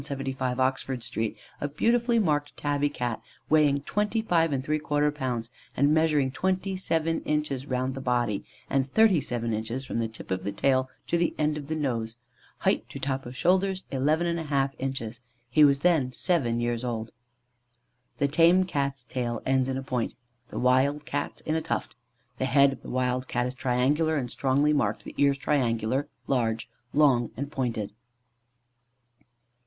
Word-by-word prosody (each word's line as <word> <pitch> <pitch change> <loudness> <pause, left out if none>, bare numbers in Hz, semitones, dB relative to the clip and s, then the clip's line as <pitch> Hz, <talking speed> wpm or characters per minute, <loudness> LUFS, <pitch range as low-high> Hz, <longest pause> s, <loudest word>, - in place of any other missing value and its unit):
175, 135 -2 -3
Oxford 130 -1 0
Street, 115 -2 -2 0.2
a 145 - 0
beautifully 235 - +2
marked 150 -8 0
tabby 145 0 0
Cat 120 -5 -3 0.3
weighing 145 -2 +4
25¾ 210 +7 -1
lbs., 150 - 0 0.3
and 140 +3 +4
measuring 150 -4 +3
27 185 -2 0
inches 150 -3 -1
round 130 0 -1
the 135 - -6
body, 120 -5 0 0.2
and 135 -1 0
37 140 - +3
inches 115 +5 -3
from 115 - -3
the 115 - 0
tip 110 -3 -11
of 95 0 -1
the 100 - -2
tail 130 +5 +1 0.2
to 170 - 0
the 170 - +1
end 150 0 +1
of 145 -2 -6
the 160 - -2
nose; 115 -7 -2 0.5
height - - +1
to - - -7
top 135 -2 -2
of 125 +1 -8
shoulders 190 +3 +2
11½ 150 0 +1
inches: 130 -3 -4 0.3
he 150 +5 +6
was 140 -1 +6
then 155 -8 +3
seven 130 -7 +1
years 120 0 -1
old. 115 -2 -3 1.1
The 140 - +2
tame 170 +5 +5
Cat's 140 -7 -2
tail 120 -3 -2
ends 130 0 +2
in 130 - -1
a 135 - -4
point; 125 -3 -2 0.3
the - - -8
wild 135 +4 +2
Cat's 145 - -3
in 155 - -2
a 160 - +1
tuft. - - -3 0.5
The 130 - +1
head 140 +1 +5
of 125 - -12
the - - -9
wild 125 0 0
Cat 120 0 0
is 125 - -3
triangular 135 +5 +1
and 125 -3 -2
strongly 140 +3 +2
marked, 110 -7 0
the - - -9
ears 140 -1 +4
triangular, 130 -2 0 0.2
large, 115 -4 0 0.2
long 130 -6 +4
and 140 +2 -4
pointed. 120 -8 -2
135 Hz, 160 wpm, -27 LUFS, 125-150 Hz, 1.1 s, he